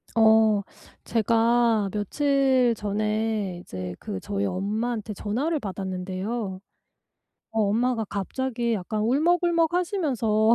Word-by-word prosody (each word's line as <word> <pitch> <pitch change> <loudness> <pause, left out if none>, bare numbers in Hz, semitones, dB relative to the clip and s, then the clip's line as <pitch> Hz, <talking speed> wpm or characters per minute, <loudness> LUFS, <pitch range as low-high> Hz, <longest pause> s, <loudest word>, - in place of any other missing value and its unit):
어 220 -2 +5 0.4
제가 230 -1 +2
며칠 260 +3 +2
전에 210 -2 -1
이제 90 -1 -6
그 95 -2 -5
저희 100 +1 -2
엄마한테 215 - -2
전화를 265 - -1
받았는데요. 190 +1 -4 0.9
어 225 - 0
엄마가 225 +3 +1
갑자기 235 +4 -2
약간 210 +1 -2
울먹울먹하시면서 320 - +2
220 Hz, 235 characters per minute, -25 LUFS, 200-245 Hz, 0.9 s, 어